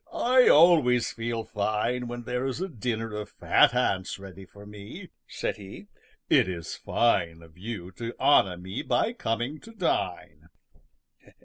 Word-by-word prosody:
"I 255 +1 +4
always 150 -7 +5
feel 115 0 -4
fine 110 +4 -2
when 120 0 -6
there 125 +2 -2
is 135 - -4
a 190 - -2
dinner 115 - -4
of 105 0 -5
fat - - +3
ants 95 -1 0
ready 95 -1 -11
for 100 +2 -15
me," 105 - -11 0.2
said - - -4
he. 100 0 -11 0.4
"It - - +4
is 85 -3 -5
fine 85 -8 0
of 80 -1 -18
you 95 -2 -7
to 115 0 -5
honor 95 -11 +4
me 95 +3 -6
by 215 - 0
coming 120 - -3
to 225 - -14
dine." 170 - -3
115 Hz, 150 wpm, -27 LUFS, 95-125 Hz, 0.4 s, always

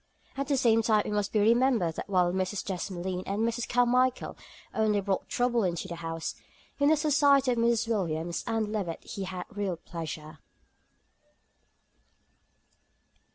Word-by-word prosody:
At 275 0 -3
the 280 -2 +1
same 225 -3 +4
time 215 -2 +3
it - - -3
must 205 -1 -1
be 215 - +2
remembered 230 -5 +3
that - - -6
while 180 -2 +2
Mrs. 190 +2 -2
Desmoulins 185 -1 -3
and 205 +3 0
Miss 230 +1 -1
Carmichael 250 +1 +2 0.4
only 215 -2 +2
brought 195 -1 -2
trouble 245 -2 +1
into 175 -3 -2
the 170 - -6
house, 165 -1 -4 0.5
in 285 +1 +4
the 315 - +4
society 280 -3 +4
of 240 - 0
Mrs. 235 0 +2
Williams 170 -6 -1
and 225 -2 -1
Levett 190 -6 -3
he 195 - -5
had 185 -1 -5
real 200 -4 -2
pleasure. 155 -2 -7
210 Hz, 150 wpm, -29 LUFS, 180-240 Hz, 0.5 s, same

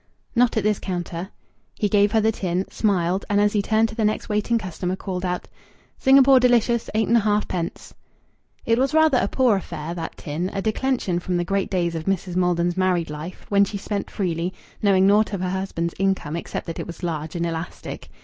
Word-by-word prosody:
"Not 240 -1 +3
at 215 - +1
this 210 -1 +1
counter." 175 0 -4 0.5
He 210 - 0
gave 205 0 +3
her 220 - +4
the 220 +1 +3
tin, 185 -2 -2
smiled, 185 -3 +1
and 205 0 +3
as 205 0 +3
he 210 - +2
turned 220 +2 +2
to - - -8
the 225 - -1
next 215 0 0
waiting 210 +2 +1
customer, 185 -3 -3
called 185 -1 -5
out 180 -1 -2 0.5
"Singapore 270 0 +6
Delicious, 240 -2 +2
eight 220 0 +2
and 235 - +4
a - - +5
half 210 0 +1
pence." 170 -2 -4 0.7
It 230 +1 +2
was 270 +3 +1
rather 315 -5 +5
a - - +1
poor 250 -6 +3
affair, 165 -3 -5
that 165 -2 -6
tin 160 +5 -3
a 195 - -1
declension 220 -5 0
from 180 0 -2
the 175 - -1
great 195 +1 -1
days 175 -3 0
of 160 -1 -4
Mrs. 190 -2 -1
Maldon's 175 -1 +1
married 180 -4 +1
life, 155 +4 -8
when 200 0 +5
she 200 +1 -2
spent 200 0 -4
freely, 180 -1 -2 0.3
knowing 195 -2 +4
naught 210 +2 +4
of 195 - -2
her 180 -1 -1
husband's 185 -3 -2
income 190 -6 0
except 170 - -5
that 165 - -6
it - - -5
was 170 +1 -9
large 160 -1 -3
and 170 0 -1
elastic. 165 0 -6
195 Hz, 210 wpm, -23 LUFS, 175-215 Hz, 0.7 s, Singapore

